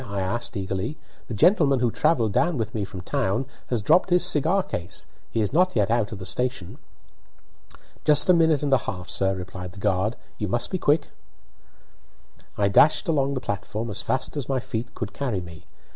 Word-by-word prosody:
I 100 -1 -3
asked, 100 +6 -3
eagerly. 95 +9 -3 0.3
"The 115 - -5
gentleman 140 - +4
who 120 -1 +1
travelled 115 -9 +1
down 170 +4 +2
with 110 -4 -3
me 105 - -2
from 95 -1 -8
town 100 +7 -1 0.2
has 120 -4 -1
dropped 180 - +4
his 180 0 +4
cigar 175 +3 +2
case; 85 - -5 0.2
he 115 - -1
is 105 - -1
not 180 +3 +3
yet 105 -2 +2
out 115 -1 +1
of 110 - -6
the 95 - -8
station." 110 0 -3 1.2
"Just 150 -1 +5
a 180 - +7
minute 160 -4 +3
and 140 -2 +1
a 135 - +5
half, 90 -3 -6
sir," 95 0 +1
replied 90 -1 -7
the - - -15
guard. 100 +4 0 0.2
"You 105 - -1
must 120 +5 -1
be 185 - -1
quick." 145 -1 +2 1.5
I 100 - +2
dashed 140 +10 +4
along 140 -4 +1
the 130 - -3
platform 110 +1 -4
as 100 - -3
fast 130 - -2
as 145 -3 -4
my 135 -1 +1
feet 115 -1 -5
could 110 -3 -5
carry 125 -9 -2
me. 85 -2 -11
115 Hz, 195 wpm, -24 LUFS, 100-145 Hz, 1.5 s, a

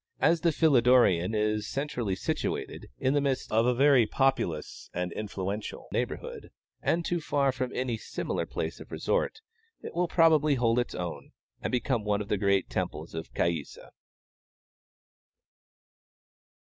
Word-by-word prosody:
As 165 -1 +3
the 170 - +3
Philidorean 125 - +4
is 105 0 0
centrally 125 -8 -2
situated, - - -3
in 130 - +1
the 145 - +3
midst 135 -2 -1
of 115 +2 +3
a 125 - +4
very 135 -3 +5
populous 135 - -1
and 90 0 -2
influential 100 0 -5
neighborhood, - - -4 0.3
and 170 0 +1
too 175 -1 -1
far 140 -2 +1
from 130 -1 -3
any 125 -3 -1
similar - - -3
place - - -4
of - - -12
resort, 445 - -1 0.4
it - - -7
will 175 +1 +1
probably 155 -3 +4
hold 120 -1 +2
its 120 - -2
own, 90 -2 -6 0.3
and - - -2
become 125 -2 0
one 105 -1 +1
of 105 0 -5
the 105 - +1
great 100 -2 +2
temples - - -4
of 80 0 -6
Caïssa. 85 -4 -2
120 Hz, 145 wpm, -29 LUFS, 100-140 Hz, 0.4 s, very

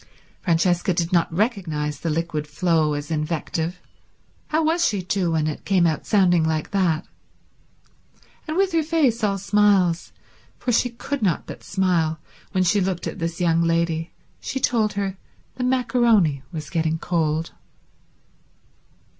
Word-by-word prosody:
Francesca 175 +1 +1
did 170 +1 -1
not 170 -1 +2
recognize 165 - -1
the 165 - -2
liquid 155 -1 -2
flow 155 -1 +1
as 145 +2 -5
invective; 160 +2 -2 0.7
how 315 +1 +1
was 330 +2 +2
she 205 - +1
to, 180 0 0
when 160 -2 +1
it 155 -1 -4
came 185 -3 +3
out 160 -2 -1
sounding 180 -5 +4
like 160 -1 -1
that? 175 -4 +1 1.4
And 310 +2 -2
with 390 0 +2
her 330 - +2
face 295 -8 +1
all 200 -2 +1
smiles, 195 -4 +2 0.5
for 250 - -2
she 245 +2 +2
could 265 +4 -5
not 185 -7 0
but - - -9
smile 175 -5 +1 0.3
when 185 -2 +2
she 190 +3 +2
looked 185 -2 -2
at - - -5
this 165 0 -3
young 165 -2 +2
lady, 165 -1 0 0.3
she 265 - -4
told 225 -6 +1
her 195 -1 -3 0.4
the 250 - -2
maccaroni 235 - +2
was 155 -3 -6
getting 160 -2 0
cold. 160 -2 -1
175 Hz, 145 wpm, -23 LUFS, 160-210 Hz, 1.4 s, sounding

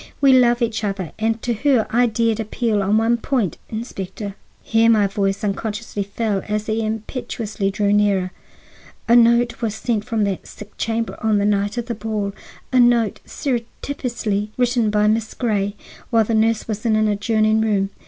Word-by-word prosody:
We 275 -2 +5
love 240 -1 +4
each 225 -1 -1
other, 195 -4 -3
and 225 +1 0
to 240 - 0
her 245 0 +2
I 240 +2 +4
dared 225 0 0
appeal 220 -1 0
on 200 +2 +2
one 230 +2 +2
point. 235 - -1
Inspector—" 205 -3 -5 0.3
here 225 0 +3
my 215 -3 +4
voice 195 +1 -1
unconsciously 210 +1 -3
fell 200 0 -2
as 210 0 -1
he 220 +1 -1
impetuously 220 -2 -3
drew 200 +1 +1
nearer—"a 205 +3 -1
note 235 +1 +4
was 220 -2 -1
sent 220 -1 -1
from 220 -1 -1
that 200 -2 -2
sick 210 0 -12
chamber 225 0 -2
on 220 -1 +2
the 200 - +1
night 205 +2 0
of 240 - -2
the 240 - -3
ball,—a 215 +3 -3
note 240 -4 +3
surreptitiously 235 -4 -3
written 245 -3 +2
by 210 0 +2
Miss 220 0 0
Grey, 205 -4 -1 0.3
while 230 -2 +4
the 225 - -2
nurse 220 0 +2
was 215 -1 -4
in 225 -2 +2
an 215 0 +3
adjoining 215 +1 +2
room. 200 -3 +1
220 Hz, 170 wpm, -21 LUFS, 205-230 Hz, 0.3 s, We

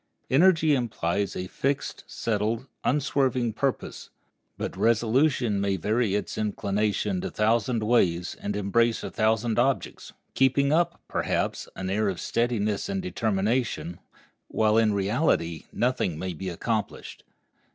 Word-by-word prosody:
Energy 160 +1 +5
implies 100 -6 -1
a 90 - -3
fixed, 135 +9 -2
settled, 110 +1 -1 0.2
and 130 - +2
unswerving 130 -5 0
purpose; 135 +3 -3 0.5
but - - -4
resolution 115 -1 +2
may 100 -1 +1
vary 105 +3 0
its 105 - -3
inclination 105 -2 -1
a - - -2
thousand 115 +2 +1
ways 90 -7 +2
and 100 0 -3
embrace 115 +3 +1
a - - -5
thousand 110 +1 +1
objects, 135 +2 -1 0.2
keeping 140 +2 +3
up, 170 +1 +1
perhaps, - - -1
an 95 - -4
air 100 +2 +1
of 95 - -4
steadiness 110 - -1
and 195 -1 -2
determination, 110 - -1 0.5
while, 110 -1 +2
in 110 -1 +4
reality, 100 - 0
nothing 120 -9 0
may 90 +2 -4
be 95 +4 -5
accomplished. 105 +5 -3
110 Hz, 130 wpm, -26 LUFS, 100-125 Hz, 0.5 s, Energy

